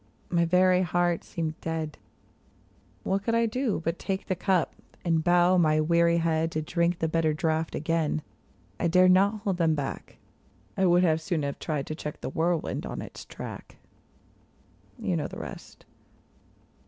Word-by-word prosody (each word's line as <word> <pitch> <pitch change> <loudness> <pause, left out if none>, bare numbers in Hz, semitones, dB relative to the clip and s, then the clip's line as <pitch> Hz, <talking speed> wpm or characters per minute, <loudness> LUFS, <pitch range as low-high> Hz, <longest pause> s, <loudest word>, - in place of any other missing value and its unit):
My 170 -1 +3
very 180 +1 +4
heart 175 -1 +1
seemed 160 -1 -4
dead. 160 -2 -4 1.0
What 195 +1 0
could 230 +3 0
I 230 0 +3
do 230 -4 -1
but 165 +2 -1
take 195 0 -3
the 185 - -1
cup, 185 -1 +1 0.3
and 165 -2 +2
bow 175 +1 +4
my 155 -2 +3
weary 170 +2 +3
head 165 -1 +1
^i - - -14
To 155 - -1
drink 170 +2 0
the 160 - 0
bitter 160 -1 +1
draught 160 +1 -1
again? 155 -1 0 0.6
I - - +1
dared 180 +2 +5
not 200 +3 +3
hold 195 -4 -1
them 165 -2 +2
back; 140 -2 -5 0.6
I 190 - +2
would 175 +1 +5
as 160 -1 +2
soon 165 -3 -1
have 140 0 -3
tried 150 -4 -2
to - - -5
check 150 -1 -6
the - - -4
whirlwind 165 +1 -1
on - - -5
its - - -8
track. - - -9 1.2
You 215 -7 -1
know 155 - -1
the - - -9
rest. - - -9
170 Hz, 170 wpm, -27 LUFS, 160-185 Hz, 1.2 s, dared